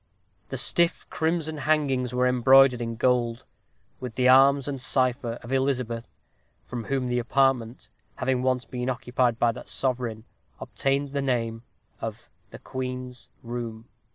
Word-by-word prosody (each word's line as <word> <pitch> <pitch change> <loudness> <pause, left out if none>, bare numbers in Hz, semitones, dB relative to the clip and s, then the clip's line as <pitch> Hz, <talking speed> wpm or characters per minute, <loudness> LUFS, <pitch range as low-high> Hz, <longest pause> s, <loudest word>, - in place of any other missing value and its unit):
The 135 - -4
stiff 170 +7 +2
crimson 160 -1 -1
hangings 140 -4 +1
were 125 0 +1
embroidered 125 0 +5
in 115 -1 -3
gold, 120 -1 +1 0.5
with 125 -3 -7
the 125 -1 +2
arms 135 +1 +6
and 135 -3 -4
cipher 125 -3 0
of 120 - -9
Elizabeth, 125 -3 -1 0.6
from 120 -3 -6
whom 135 -2 -1
the 125 0 0
apartment, 125 -1 +1 0.3
having 130 -1 0
once 130 -1 0
been 125 +2 -4
occupied 125 -1 0
by 120 0 +3
that - - -10
sovereign, 120 -4 -2 0.4
obtained 140 +1 -1
the 140 0 -2
name 115 -4 -1 0.4
of - - -7 0.2
the - - -10
"Queen's 125 -1 -6
Room." 115 -2 -6
125 Hz, 140 wpm, -26 LUFS, 120-135 Hz, 0.6 s, arms